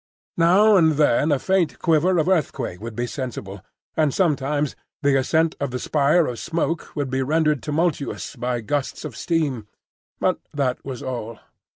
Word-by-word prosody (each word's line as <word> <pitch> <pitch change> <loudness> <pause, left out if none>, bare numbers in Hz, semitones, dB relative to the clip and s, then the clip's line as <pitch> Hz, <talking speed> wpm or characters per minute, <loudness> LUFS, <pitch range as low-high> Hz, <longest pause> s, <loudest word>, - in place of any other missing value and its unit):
Now 195 +5 +6
and 160 -3 +4
then 150 0 +3
a 145 - +3
faint 185 +3 +1
quiver 170 +3 +2
of 160 - +1
earthquake 140 - -1
would 115 0 -6
be 120 - -1
sensible, 120 -7 -6 0.3
and 155 -3 +2
sometimes 145 -3 0 0.3
the 140 -1 +4
ascent 160 +5 +2
of 140 - -1
the 125 - -3
spire 150 +5 +2
of 120 -2 -4
smoke 165 -1 -2
would 140 -3 -2
be 130 0 0
rendered 150 +1 +1
tumultuous 150 -2 -2
by 125 -1 -2
gusts 145 +5 -3
of 140 -7 -6
steam; 140 -7 -1 0.5
but - - +1 0.2
that 130 -3 -1
was 130 -3 -6
all. 115 -3 -5
145 Hz, 165 wpm, -23 LUFS, 130-165 Hz, 0.5 s, Now